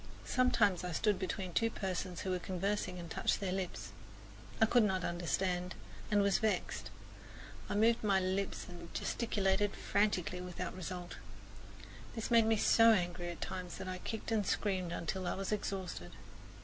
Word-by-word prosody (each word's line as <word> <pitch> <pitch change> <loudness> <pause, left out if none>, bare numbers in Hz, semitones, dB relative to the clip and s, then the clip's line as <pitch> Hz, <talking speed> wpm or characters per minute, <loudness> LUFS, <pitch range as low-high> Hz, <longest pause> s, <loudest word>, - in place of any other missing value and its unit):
Sometimes 225 -8 +3
I 180 -1 -3
stood 205 +3 +2
between 185 -1 -3
two 230 +5 +3
persons 185 -4 -3
who 190 - -2
were 180 - 0
conversing 185 +1 -2
and 170 -1 -6
touched - - 0
their 195 -2 -2
lips. 185 -1 -3 0.7
I 225 - +7
could 240 +2 +4
not 190 -3 +1
understand, 180 +1 -1 0.3
and 205 -2 +4
was 200 -1 +3
vexed. 220 -1 -1 0.8
I - - -1
moved 225 +2 +4
my 200 -2 +4
lips 190 +1 -1
and 175 -1 -10
gesticulated 205 -3 +1
frantically 185 -4 0
without 180 -1 -5
result. 180 -1 -6 1.0
This 225 +1 -4
made 230 -1 +6
me 225 -1 +4
so 230 +2 +6
angry 175 -2 -1
at 170 - -7
times 180 -2 -4
that 190 - -6
I 185 0 -4
kicked 220 +3 -5
and 220 -2 +2
screamed 185 -3 0
until 175 +2 -3
I - - 0
was 195 +1 -3
exhausted. 190 - -3
190 Hz, 160 wpm, -35 LUFS, 180-210 Hz, 1.0 s, I